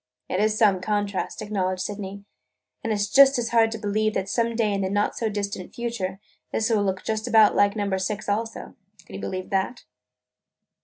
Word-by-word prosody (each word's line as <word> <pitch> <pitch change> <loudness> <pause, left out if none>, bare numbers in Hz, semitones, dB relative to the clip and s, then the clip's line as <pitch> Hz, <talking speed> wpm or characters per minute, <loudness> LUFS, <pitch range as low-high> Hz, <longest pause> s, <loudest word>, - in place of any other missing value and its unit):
"It 185 - -1
is 215 +1 +2
some 200 -5 +4
contrast!" 205 0 -2
acknowledged 185 -3 -1
Sydney. 200 -1 -6 0.6
"And 225 - -1
it 215 - +1
's 205 0 0
just 275 +4 +6
as 235 -2 -1
hard 230 -1 +4
to 225 - -3
believe 215 0 0
that 190 - -1
some 230 +2 0
day 220 -3 +1
in 195 - -1
the 190 - -1
not 205 +1 0
far 225 - 0
distant 200 -3 -4
future 220 -6 -3 0.3
this 225 +1 0
will 215 -2 +3
look 190 -1 -2
just 220 +1 -2
about 220 -3 +5
like 200 0 +3
Number 200 -2 -1
Six 210 +2 -3
also. 225 +2 -3 0.3
Can - - -14
you - - -6
believe 185 0 -5
that?" 195 +5 -1
205 Hz, 200 wpm, -25 LUFS, 195-225 Hz, 0.6 s, just